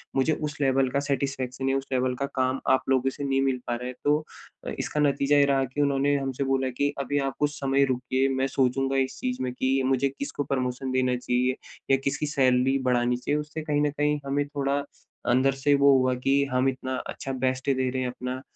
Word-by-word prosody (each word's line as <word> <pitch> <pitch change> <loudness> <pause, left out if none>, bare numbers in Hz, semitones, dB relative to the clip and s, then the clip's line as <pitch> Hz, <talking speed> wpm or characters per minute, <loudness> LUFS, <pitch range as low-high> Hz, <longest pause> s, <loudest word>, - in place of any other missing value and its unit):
मुझे 135 +4 +2
उस 150 -1 -4
लेवल 135 -1 +2
का 140 +2 0
सैटिस्फैक्शन 135 -2 -2
या 135 - +2
उस 135 - -4
लेवल 125 0 +1
का 140 - -2
काम 130 0 +1
आप 130 - +4
लोगों 135 0 +3
से 145 - -7
नहीं 135 -1 +1
मिल 135 -1 +1
पा 120 - 0
रहा 125 +1 -5
है 125 - -5
तो 145 +1 +4 0.5
अ, - - -1
इसका 150 - -2
नतीजा 145 0 +3
ये 140 - +6
रहा 135 -1 +2
कि 130 +4 -3
उन्होंने 140 0 +2
हमसे 135 -1 -2
बोला 135 0 +1
कि 145 0 +1
अभी 145 +1 0
आप - - -10
कुछ 145 0 +2
समय 140 0 +2
रुकिए 130 +1 0
मैं 130 +1 +1
सोचूँगा 135 +1 +1
इस 135 -1 -1
चीज़ 255 -1 -2
में 125 - -2
कि 130 +1 +1
मुझे 135 +1 +2
किसको 145 0 -3
प्रमोशन 130 -1 -2
देना 130 -1 +1
चाहिए, 125 +1 0 0.4
या 135 - +6
किसकी 140 +2 -1
सैलरी 130 0 +3
बढ़ानी 120 0 +2
चाहिए 145 +4 -1
उससे 150 +1 -5
कहीं 145 -1 0
न 150 - +1
कहीं 150 0 +1
हमें 140 +1 0
थोड़ा 140 -1 -1 0.6
अंदर 135 +2 +3
से 145 - +5
वो 140 0 +7
हुआ 130 0 +2
कि 140 +1 +4
हम 130 +1 +3
इतना 130 0 -4
अच्छा 135 - -5
बेस्ट 130 +1 -1
दे 130 -1 +1
रहे 130 +1 -2
हैं 125 - -1
अपना, 125 +1 -5
135 Hz, 225 wpm, -26 LUFS, 130-140 Hz, 0.6 s, वो